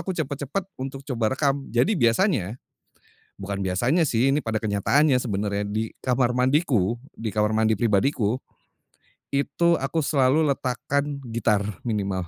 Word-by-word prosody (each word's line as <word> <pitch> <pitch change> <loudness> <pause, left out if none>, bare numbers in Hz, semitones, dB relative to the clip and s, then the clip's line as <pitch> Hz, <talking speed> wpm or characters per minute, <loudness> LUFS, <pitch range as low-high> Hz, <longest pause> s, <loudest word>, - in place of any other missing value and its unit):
aku 185 +3 -3
cepet-cepet 145 +4 -3 0.2
untuk 135 +1 -5
coba 125 -2 -1
rekam. 140 -1 0
Jadi, 120 - +2
biasanya, 120 - +2 0.8
bukan 100 0 -5
biasanya 125 - +2
sih, 125 +2 +2
ini 140 - +2
pada 115 -6 -2
kenyataannya 125 +7 +3
sebenarnya, 100 -3 -2
di 110 +2 -2
kamar 125 -1 +1
mandiku, 125 - +2 0.2
di 110 -2 -4
kamar 105 0 +2
mandi 110 0 +2
pribadiku. 110 +2 +1 0.9
Itu, 170 +4 +1
aku 145 +4 -1
selalu 140 +1 +3
letakkan 140 +2 -2
gitar, 110 -3 +1 0.2
minimal. 95 -5 -2
125 Hz, 130 wpm, -24 LUFS, 110-140 Hz, 0.9 s, kenyataannya